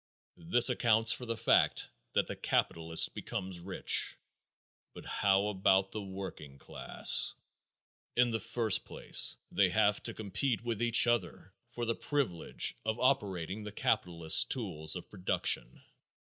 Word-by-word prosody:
This 120 +6 +7
accounts 115 -2 +3
for 125 - -7
the 115 -1 -4
fact - - +1 0.2
that - - +1
the - - -7
capitalist 80 0 +1
becomes 95 -1 -6
rich. 95 +2 -2 0.8
But - - -12
how 100 +1 0
about 95 -1 +1
the 110 - -6
working 95 -8 -9
class? - - +2 0.8
In 120 -1 +2
the 115 - -2
first 110 0 -1
place - - 0
they - - +2
have - - 0
to - - -5
compete 115 +4 -3
with 115 -3 -4
each 120 0 +6
other 95 -5 -3 0.2
for 120 0 -6
the 115 - -1
privilege 125 - -2
of 110 +1 -3
operating 100 -6 -2
the 105 - -8
capitalist's 85 -7 +3
tool 80 +1 -2
of 90 - -8
production. 90 - -1
105 Hz, 135 wpm, -30 LUFS, 90-115 Hz, 0.8 s, This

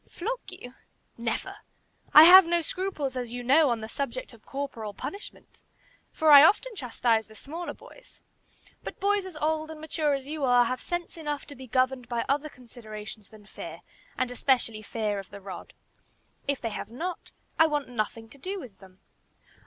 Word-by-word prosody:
"Flog 470 +7 -3
you! 255 -10 -11 0.4
Never! - - -3 0.5
I 305 - +11
have 360 +1 +10
no 340 0 +2
scruples, 320 -6 -3
as 245 -2 -4
you 245 0 -5
know, 285 +4 +5
on 235 -2 -1
the 220 - -5
subject 280 - -5
of - - -17
corporal 235 -7 -5
punishment, 400 +1 -9 0.5
for 315 -1 +3
I 285 -1 +11
often 445 +7 +3
chastise 235 - 0
the 220 - -16
smaller 330 +9 -6
boys; - - -17 0.6
but - - -7
boys 400 -1 +1
as 365 - -10
old 310 +1 -1
and 315 -1 -8
mature 305 -2 0
as 270 -1 -6
you 300 0 -5
are 245 -2 +5
have 255 +2 -3
sense 345 -1 -4
enough 295 -3 -4
to 285 - -11
be 260 +1 -11
governed 255 0 0
by 235 -1 -1
other 290 +2 0
considerations 220 -4 -10
than 215 -2 -16
fear, - - -9 0.4
and 255 -1 -1
especially 245 -4 +1
fear 210 -1 -2
of 195 - -10
the 200 - -10
rod. 190 -2 -9 0.8
If 280 -1 0
they 230 - -3
have 210 - -6
not, 335 +10 -6 0.3
I 320 - +7
want 295 -3 -1
nothing 225 -1 -3
to 280 - -16
do 385 +7 -4
with 230 - -12
them." 190 -1 -18
270 Hz, 185 wpm, -27 LUFS, 230-320 Hz, 0.8 s, I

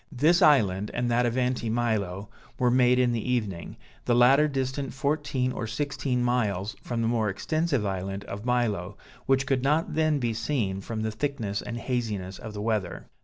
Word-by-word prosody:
This 155 +6 +3
island, 105 -9 +4
and 120 0 0
that 120 +1 +3
of 120 +1 -2
Anti 125 -2 0
Milo, 105 -5 -1 0.3
were 125 -1 +2
made 125 0 +4
in 125 -1 +3
the 115 -1 -1
evening, 105 -9 -3 0.3
the 120 - +2
latter 135 +5 +6
distant 135 -1 -3
fourteen 140 -2 0
or 120 - -4
sixteen 130 0 -1
miles 105 -5 0
from 115 -2 -2
the - - +1
more 115 -2 +1
extensive 150 - -1
island 95 +1 -3
of 100 0 -7
Milo, 110 -6 -1 0.3
which 135 0 +3
could 130 -2 +1
not 150 +5 +1
then 155 -1 +2
be 120 -4 -1
seen, 110 -5 -1
from 110 +2 -4
the 110 - -1
thickness 110 -4 -2
and 120 - -5
haziness 110 -7 -3
of 110 -1 -8
the 105 - -4
weather. 105 -5 -2
120 Hz, 180 wpm, -27 LUFS, 105-130 Hz, 0.3 s, latter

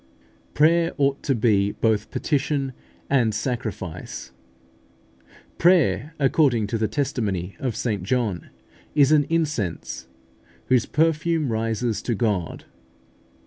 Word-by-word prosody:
Prayer 165 +3 +4
ought 140 -1 +1
to 135 - 0
be 105 -3 +2
both 110 -2 0
petition 140 -2 -1 0.3
and 120 -6 +2
sacrifice. 95 - -4 1.3
Prayer, 165 -3 +3
according 135 -5 +3
to 115 +2 -2
the 110 - +1
testimony 105 -7 -2
of 125 -5 -2
St 105 -6 -2
John, 105 -3 -1 0.5
is 145 -1 +5
an 150 -2 +5
incense, 120 - -2 0.6
whose 125 -3 +3
perfume 160 -2 +1
rises 115 0 -1
to 120 - -1
God. 100 -6 -2
125 Hz, 105 wpm, -23 LUFS, 105-145 Hz, 1.3 s, is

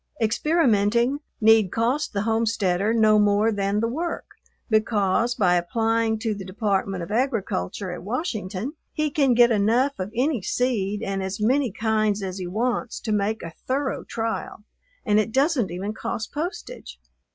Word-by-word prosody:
Experimenting 235 -1 +2 0.2
need 220 -3 +5
cost 245 +7 0
the 200 -1 -1
homesteader 220 -3 +1
no 215 -2 +4
more 205 +2 +3
than 200 0 0
the 230 - +1
work, 330 +8 -3 0.4
because 220 +1 +1
by 185 -7 +3
applying 225 +5 +1
to 220 0 -2
the 200 -1 -7
Department 195 -1 -1
of 170 - -8
Agriculture 210 - -1
at - - -6
Washington 215 - -3 0.2
he 305 -1 -1
can 275 -4 +3
get 240 0 +6
enough 230 +6 +2
of 185 +2 -4
any 255 -1 +1
seed 210 -1 -1
and 195 0 -2
as 190 +2 -4
many 250 +3 +2
kinds 215 -1 0
as 190 0 -4
he 180 - -4
wants 235 +5 -2
to 220 - -4
make 210 +2 0
a 165 - -7
thorough 265 +1 -1
trial, 225 -2 -4 0.4
and 210 0 +3
it 215 +1 0
doesn't 270 - +2
even 190 +5 -4
cost 220 0 -4
postage. 390 +11 -6
220 Hz, 155 wpm, -24 LUFS, 200-245 Hz, 0.4 s, get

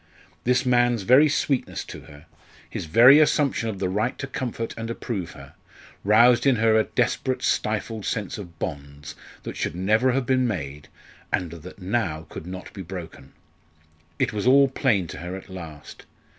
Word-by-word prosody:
This 125 +2 +2
man's 120 -3 +2
very 130 +8 +6
sweetness 140 -2 -1
to - - -9
her, 75 -1 -15 0.4
his - - -5
very 125 - +8
assumption 145 -6 +2
of 105 - -5
the 95 -1 -1
right 105 +6 -1
to 140 - -4
comfort 125 -3 -4
and 115 0 -5
approve 100 -7 -4
her, 70 -1 -13 0.5
roused 120 +6 +5
in 135 - +5
her 110 -1 +3
a 110 - +3
desperate 130 +1 -1
stifled 110 0 -1
sense 110 +2 -3
of 85 -5 -10
bonds 70 -2 -6 0.3
that - - -6
should - - -3
never 110 +8 +2
have 135 0 0
been 130 -1 +2
made, 75 -8 -5 0.4
and 90 -3 -1
that 85 +2 -10
now 90 -6 -1
could 80 - -8
not 90 0 -8
be 100 - -7
broken. 85 -7 -9 0.8
It - - 0
was 105 +3 -2
all 135 +1 +6
plain 120 -8 +1
to 80 - -8
her 90 +2 -6
at 95 - -10
last. 80 -5 -10
110 Hz, 170 wpm, -24 LUFS, 85-125 Hz, 0.8 s, very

